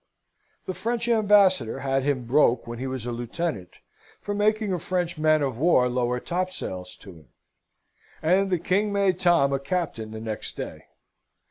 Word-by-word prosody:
The 185 Hz, -, -3 dB
French 230 Hz, +5 st, -2 dB
Ambassador 200 Hz, -, +3 dB
had 135 Hz, 0 st, 0 dB
him 130 Hz, -3 st, -1 dB
broke, 125 Hz, -2 st, +3 dB
when 120 Hz, 0 st, -7 dB
he 135 Hz, -, -3 dB
was 130 Hz, -3 st, -5 dB
a 120 Hz, -, -3 dB
lieutenant, 120 Hz, -, -4 dB, 0.5 s
for 205 Hz, -, -4 dB
making 210 Hz, 0 st, +1 dB
a 180 Hz, -, -1 dB
French 175 Hz, -1 st, -2 dB
man 155 Hz, -1 st, +3 dB
of 130 Hz, -4 st, -2 dB
war 150 Hz, -5 st, +4 dB
lower 125 Hz, 0 st, 0 dB
topsails 170 Hz, -, -4 dB
to 95 Hz, -, -11 dB
him, 80 Hz, -5 st, -17 dB, 0.9 s
and 185 Hz, +5 st, +2 dB
the 180 Hz, -, +2 dB
King 195 Hz, +5 st, 0 dB
made 195 Hz, -3 st, +1 dB
Tom 170 Hz, -7 st, +3 dB
a 135 Hz, -, 0 dB
captain 140 Hz, -7 st, -3 dB
the 110 Hz, 0 st, -7 dB
next 110 Hz, -1 st, -6 dB
day. -, -, -7 dB
155 Hz, 165 wpm, -25 LUFS, 125-185 Hz, 0.9 s, war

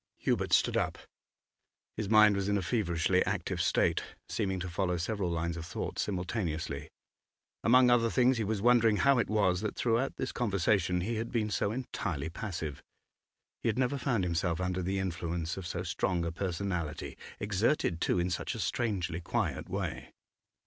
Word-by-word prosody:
Hubert -, -, 0 dB
stood -, -, +4 dB
up. -, -, 0 dB, 1.0 s
His 105 Hz, -3 st, -3 dB
mind 110 Hz, -1 st, +7 dB
was 100 Hz, 0 st, -1 dB
in 100 Hz, -, +2 dB
a 95 Hz, -, -2 dB
feverishly 90 Hz, -4 st, +1 dB
active 95 Hz, -2 st, -1 dB
state, -, -, +2 dB, 0.3 s
seeming 95 Hz, -4 st, -1 dB
to 95 Hz, -, -3 dB
follow 90 Hz, 0 st, -1 dB
several 95 Hz, +1 st, -1 dB
lines 85 Hz, 0 st, -2 dB
of 85 Hz, -, -5 dB
thought 80 Hz, -, -5 dB
simultaneously. 85 Hz, -6 st, -2 dB, 0.7 s
Among 125 Hz, +1 st, +6 dB
other 115 Hz, -1 st, +4 dB
things, 125 Hz, 0 st, +3 dB
he -, -, +1 dB
was 105 Hz, -1 st, -2 dB
wondering 115 Hz, -3 st, +5 dB
how 140 Hz, +1 st, +4 dB
it -, -, 0 dB
was 100 Hz, -4 st, +2 dB
that 110 Hz, -, -3 dB
throughout 120 Hz, +3 st, +1 dB
this -, -, -3 dB
conversation 95 Hz, -5 st, +1 dB
he 110 Hz, +5 st, -2 dB
had 115 Hz, +1 st, -3 dB
been 110 Hz, -3 st, 0 dB
so 100 Hz, -, 0 dB
entirely 90 Hz, -, -3 dB
passive. 80 Hz, -6 st, -5 dB, 0.8 s
He -, -, +1 dB
had 110 Hz, -, -1 dB
never 130 Hz, +2 st, +1 dB
found 125 Hz, -7 st, +1 dB
himself 85 Hz, -1 st, 0 dB
under 90 Hz, 0 st, -1 dB
the 95 Hz, +2 st, -1 dB
influence 85 Hz, -3 st, -2 dB
of 95 Hz, -2 st, -6 dB
so 85 Hz, 0 st, -3 dB
strong 85 Hz, 0 st, -1 dB
a 85 Hz, -, -1 dB
personality, 85 Hz, -3 st, -3 dB, 0.2 s
exerted 100 Hz, -, +1 dB
too -, -, +2 dB
in 90 Hz, +1 st, 0 dB
such -, -, -2 dB
a -, -, -6 dB
strangely 90 Hz, -8 st, -1 dB
quiet -, -, -2 dB
way. -, -, -3 dB
95 Hz, 170 wpm, -31 LUFS, 85-110 Hz, 1.0 s, mind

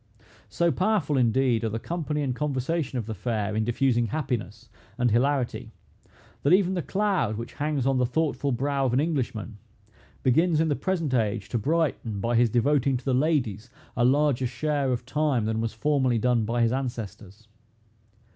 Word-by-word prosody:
So 170 Hz, 0 st, +1 dB
powerful, 185 Hz, -6 st, +1 dB
indeed, 125 Hz, -1 st, +2 dB
are 110 Hz, -, 0 dB
the 110 Hz, -, -3 dB
company 150 Hz, +2 st, -3 dB
and 130 Hz, -3 st, -1 dB
conversation 140 Hz, 0 st, -2 dB
of 115 Hz, -, -3 dB
the 110 Hz, -, -4 dB
fair, 105 Hz, 0 st, -2 dB
in 110 Hz, -, +1 dB
diffusing 120 Hz, 0 st, +1 dB
happiness 110 Hz, -, -4 dB, 0.3 s
and 125 Hz, -2 st, +2 dB
hilarity, 130 Hz, +2 st, 0 dB, 0.7 s
that 145 Hz, -, +3 dB
even 190 Hz, -1 st, +4 dB
the 180 Hz, -, -1 dB
cloud 185 Hz, -, 0 dB
which 115 Hz, -, -7 dB
hangs 145 Hz, -3 st, -1 dB
on 135 Hz, -1 st, +2 dB
the 125 Hz, -, +3 dB
thoughtful 145 Hz, +1 st, -1 dB
brow 140 Hz, +2 st, 0 dB
of 125 Hz, -, -1 dB
an 125 Hz, -, +3 dB
Englishman, 125 Hz, -8 st, -2 dB, 0.6 s
begins 160 Hz, +5 st, +3 dB
in 160 Hz, 0 st, +2 dB
the 145 Hz, -, +1 dB
present 165 Hz, -6 st, -1 dB
age 105 Hz, -4 st, 0 dB
to 120 Hz, -, -1 dB
brighten, 140 Hz, -6 st, -1 dB
by 115 Hz, +4 st, 0 dB
his 120 Hz, 0 st, +4 dB
devoting 135 Hz, +3 st, +2 dB
to 125 Hz, -, -12 dB
the 135 Hz, -, +1 dB
ladies 125 Hz, -, 0 dB, 0.3 s
a 120 Hz, -, +1 dB
larger 130 Hz, 0 st, +3 dB
share 140 Hz, +2 st, -1 dB
of 120 Hz, -1 st, -2 dB
time 140 Hz, -4 st, 0 dB
than 110 Hz, 0 st, -1 dB
was 115 Hz, -1 st, -1 dB
formerly 130 Hz, 0 st, +1 dB
done 115 Hz, -1 st, +1 dB
by 120 Hz, +2 st, +1 dB
his 115 Hz, -, +2 dB
ancestors. 110 Hz, -5 st, -5 dB
130 Hz, 175 wpm, -26 LUFS, 115-150 Hz, 0.7 s, even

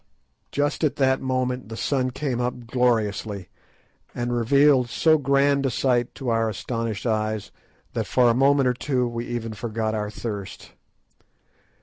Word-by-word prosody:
Just 145 Hz, +2 st, -1 dB
at 150 Hz, -, +2 dB
that 130 Hz, -1 st, +2 dB
moment 130 Hz, -2 st, -2 dB
the 115 Hz, -, -6 dB
sun 130 Hz, +2 st, 0 dB
came 130 Hz, -1 st, -2 dB
up 125 Hz, 0 st, -3 dB
gloriously, 110 Hz, -5 st, 0 dB, 0.7 s
and 120 Hz, 0 st, -1 dB
revealed 130 Hz, +1 st, +4 dB
so 155 Hz, +4 st, +3 dB
grand 140 Hz, 0 st, +2 dB
a 135 Hz, -, +1 dB
sight 120 Hz, -1 st, 0 dB
to 130 Hz, -, -4 dB
our 115 Hz, -1 st, +1 dB
astonished 115 Hz, +1 st, -4 dB
eyes 110 Hz, -2 st, -1 dB, 0.4 s
that -, -, -2 dB
for 125 Hz, -1 st, +3 dB
a 120 Hz, -, +5 dB
moment 135 Hz, +2 st, +4 dB
or 125 Hz, -, +3 dB
two 125 Hz, -1 st, -1 dB
we 120 Hz, 0 st, -4 dB
even 115 Hz, -2 st, -4 dB
forgot 110 Hz, 0 st, -3 dB
our 105 Hz, -1 st, -2 dB
thirst. 105 Hz, -3 st, -6 dB
120 Hz, 150 wpm, -24 LUFS, 115-135 Hz, 0.7 s, a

